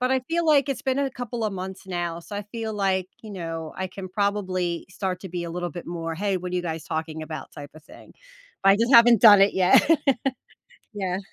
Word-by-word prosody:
but 255 Hz, +1 st, +1 dB
I 265 Hz, -, +3 dB
feel 340 Hz, +1 st, 0 dB
like 290 Hz, -3 st, +4 dB
it's 275 Hz, -, -3 dB
been 265 Hz, 0 st, 0 dB
a 280 Hz, -1 st, 0 dB
couple 240 Hz, -2 st, -5 dB
of 215 Hz, -, -1 dB
months 190 Hz, +1 st, -7 dB
now. 175 Hz, -2 st, -3 dB
So, 190 Hz, -, -10 dB
I 205 Hz, -, -3 dB
feel 225 Hz, -1 st, -4 dB
like, 190 Hz, -2 st, 0 dB, 0.2 s
you 220 Hz, -, -9 dB
know, 165 Hz, -4 st, -6 dB
I 190 Hz, -, -2 dB
can 185 Hz, +1 st, -8 dB
probably 185 Hz, -3 st, -1 dB
start 185 Hz, -1 st, -3 dB
to 190 Hz, -, -8 dB
be 175 Hz, 0 st, -4 dB
a 170 Hz, -, -6 dB
little 175 Hz, +1 st, -4 dB
bit 175 Hz, +3 st, -9 dB
more, 165 Hz, -1 st, -4 dB
"Hey, 195 Hz, +3 st, -1 dB
what 180 Hz, 0 st, -6 dB
are -, -, -2 dB
you 180 Hz, -, -1 dB
guys 160 Hz, -2 st, -4 dB
talking 160 Hz, 0 st, -4 dB
about?" 155 Hz, 0 st, -8 dB
type 145 Hz, -2 st, -10 dB
of 155 Hz, -, -14 dB
thing. -, -, -16 dB, 0.5 s
But 195 Hz, -, +6 dB
I 195 Hz, -, +5 dB
just 230 Hz, +4 st, +1 dB
haven't 235 Hz, -2 st, +7 dB
done 205 Hz, -3 st, +9 dB
it 195 Hz, +1 st, +5 dB
yet. 185 Hz, -, +5 dB, 1.0 s
Yeah. 190 Hz, -3 st, -3 dB
190 Hz, 240 wpm, -24 LUFS, 170-215 Hz, 1.0 s, done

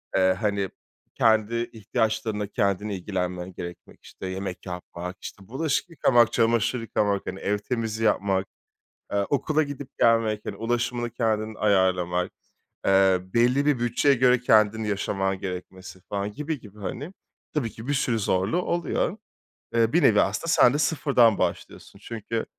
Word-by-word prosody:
eee, 95 Hz, -1 st, +4 dB
hani, 100 Hz, -2 st, 0 dB, 0.5 s
kendi 115 Hz, +1 st, +2 dB
ihtiyaçlarınla 110 Hz, -1 st, -1 dB
kendin 100 Hz, +1 st, 0 dB
ilgilenmen 90 Hz, -1 st, -3 dB
gerekmek, 85 Hz, 0 st, -9 dB
işte 95 Hz, -, -8 dB
yemek 95 Hz, 0 st, -5 dB
yapmak, 90 Hz, 0 st, -7 dB
işte 95 Hz, -2 st, -9 dB
bulaşık 150 Hz, +7 st, -1 dB
yıkamak, 120 Hz, -7 st, +3 dB
çamaşır 115 Hz, +1 st, +2 dB
yıkamak, 105 Hz, -3 st, 0 dB
hani 95 Hz, -, -5 dB
ev 105 Hz, +2 st, 0 dB
temizliği 115 Hz, 0 st, -2 dB
yapmak, 95 Hz, -2 st, +1 dB, 0.7 s
eee, 100 Hz, -1 st, +1 dB
okula 155 Hz, +2 st, +2 dB
gidip 145 Hz, -2 st, -6 dB
gelmek, 115 Hz, -2 st, +3 dB
hani -, -, -4 dB
ulaşımını 120 Hz, +1 st, -1 dB
kendin 110 Hz, -2 st, -1 dB
ayarlamak, 90 Hz, -4 st, +1 dB, 0.5 s
eee, 95 Hz, -1 st, +4 dB
belli 120 Hz, +8 st, +2 dB
bir 145 Hz, -4 st, +2 dB
bütçeye 120 Hz, +4 st, +3 dB
göre 125 Hz, 0 st, +4 dB
kendin 110 Hz, -2 st, +3 dB
yaşaman 95 Hz, -2 st, -1 dB
gerekmesi, 95 Hz, 0 st, -7 dB
falan, 100 Hz, 0 st, -2 dB
gibi 150 Hz, +4 st, -4 dB
gibi, 105 Hz, -1 st, -15 dB
hani, 145 Hz, -, -5 dB, 0.4 s
tabii 135 Hz, -7 st, -1 dB
ki 115 Hz, +2 st, -10 dB
bir 145 Hz, -, +1 dB
sürü 125 Hz, -4 st, +1 dB
zorluğu 100 Hz, -, +1 dB
oluyor. 175 Hz, +3 st, -1 dB, 0.6 s
Eee, 115 Hz, 0 st, +2 dB
bir 175 Hz, -, +4 dB
nevi 105 Hz, -2 st, +6 dB
aslında 105 Hz, +12 st, -1 dB
sen 125 Hz, -, +6 dB
de 145 Hz, -, +1 dB
sıfırdan 135 Hz, -8 st, +3 dB
başlıyorsun 100 Hz, -, -4 dB
çünkü, 115 Hz, +1 st, -4 dB
110 Hz, 145 wpm, -25 LUFS, 95-120 Hz, 0.7 s, nevi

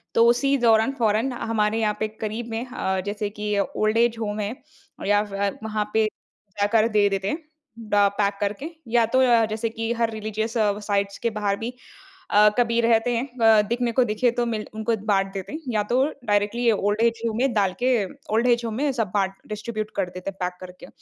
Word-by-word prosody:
तो 230 Hz, -, +6 dB
उसी 275 Hz, +4 st, +3 dB
दौरान 225 Hz, 0 st, +4 dB
फ़ौरन 225 Hz, +4 st, +2 dB
हमारे 225 Hz, -2 st, 0 dB
यहाँ 210 Hz, -2 st, 0 dB
पे 215 Hz, -, 0 dB
करीब 220 Hz, +2 st, -3 dB
में 225 Hz, +3 st, -3 dB
अ, 190 Hz, -6 st, -2 dB
जैसे 205 Hz, 0 st, -3 dB
कि 210 Hz, 0 st, -3 dB
ओल्ड-एज 225 Hz, +3 st, +1 dB
होम 210 Hz, -1 st, -3 dB
है 210 Hz, +2 st, -2 dB, 0.5 s
या 205 Hz, 0 st, +4 dB
फिर 200 Hz, -1 st, -3 dB
वहाँ 215 Hz, -1 st, -2 dB
पे 220 Hz, 0 st, +3 dB, 0.5 s
जाकर 215 Hz, +2 st, +3 dB
दे 210 Hz, -2 st, +3 dB
देते 195 Hz, 0 st, -2 dB
हैं। 315 Hz, +8 st, -3 dB, 0.4 s
ड 215 Hz, -2 st, -9 dB, 0.2 s
पैक 200 Hz, -1 st, +2 dB
करके 210 Hz, +9 st, -2 dB, 0.2 s
या 230 Hz, 0 st, +3 dB
तो 260 Hz, +4 st, +1 dB
अ, 235 Hz, -3 st, +5 dB
जैसे 220 Hz, +1 st, -2 dB
कि 225 Hz, 0 st, -3 dB
हर 230 Hz, -1 st, 0 dB
रिलीजियस 220 Hz, +1 st, -3 dB, 0.3 s
साइट्स 200 Hz, -1 st, 0 dB
के 235 Hz, -, 0 dB
बाहर 210 Hz, -2 st, -1 dB
भी 235 Hz, +2 st, -4 dB, 0.6 s
अ, 210 Hz, +1 st, +6 dB
कभी 235 Hz, -1 st, +2 dB
रहते 230 Hz, +1 st, +3 dB
हैं 250 Hz, +4 st, -1 dB
अ, 220 Hz, -1 st, +6 dB
दिखने 240 Hz, 0 st, 0 dB
को 255 Hz, +2 st, +3 dB
दिखें 235 Hz, +2 st, +1 dB
तो 240 Hz, -1 st, +1 dB
मिल 220 Hz, -2 st, -3 dB
उनको 220 Hz, +1 st, 0 dB
बाँट 195 Hz, -2 st, +2 dB
देते 195 Hz, +7 st, -6 dB
हैं। 310 Hz, -, -4 dB
या 210 Hz, -1 st, +2 dB
तो 255 Hz, +2 st, +4 dB, 0.2 s
डायरेक्टली 210 Hz, +3 st, +2 dB
ओल्ड-एज 220 Hz, +3 st, +1 dB
होम 220 Hz, 0 st, -2 dB
में 260 Hz, 0 st, +1 dB
डाल 200 Hz, -4 st, +2 dB
के 255 Hz, -, +3 dB, 0.4 s
ओल्ड-एज 235 Hz, +1 st, +3 dB
होम 225 Hz, -, -3 dB
में 280 Hz, +4 st, +1 dB
सब 225 Hz, -7 st, -2 dB
बाँट 195 Hz, -2 st, +1 dB
डिस्ट्रीब्यूट 215 Hz, 0 st, -4 dB
कर 185 Hz, -3 st, -1 dB
देते 185 Hz, +1 st, -6 dB
हैं 195 Hz, -, -23 dB
पैक 180 Hz, 0 st, -3 dB
करके। 185 Hz, +8 st, -11 dB
220 Hz, 200 wpm, -24 LUFS, 205-235 Hz, 0.6 s, तो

